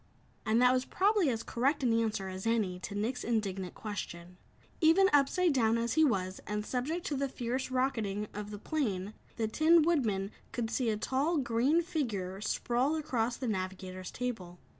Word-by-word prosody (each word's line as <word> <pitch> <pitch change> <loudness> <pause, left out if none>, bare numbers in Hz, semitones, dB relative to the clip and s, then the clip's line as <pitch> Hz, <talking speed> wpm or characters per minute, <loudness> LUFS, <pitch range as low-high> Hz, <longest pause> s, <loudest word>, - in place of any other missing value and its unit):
And 220 +2 +3
that 250 0 +6
was 255 0 +1
probably 395 0 +2
as 230 -2 -2
correct 275 +4 0
an 240 -3 +3
answer 220 -4 0
as 190 +3 -5
any 210 -6 0
to 200 - -6
Nick's 235 +5 -2
indignant 195 -5 -2
question. 180 -4 -6 0.4
Even 355 +4 +5
upside 295 +4 +4
down 230 -3 +3
as 230 0 -1
he 315 - +4
was, 190 -9 0
and 210 0 -2
subject 295 +9 -2
to 295 - -1
the 275 0 -1
fierce 255 +1 -3
rocketing 225 -6 -1
of 210 0 -6
the 210 - -6
plane, 210 -7 -2 0.2
the 225 -2 -1
Tin 315 +8 +5
Woodman 220 - +1 0.2
could 230 -3 -3
see 250 -4 0
a 215 - 0
tall, 275 +9 0
green 265 +6 +2
figure 205 - -3
sprawled 250 +7 0
across 245 -6 -1
the 260 - -4
navigator's 185 -2 -4
table. 210 -9 -5
235 Hz, 175 wpm, -31 LUFS, 205-275 Hz, 0.4 s, that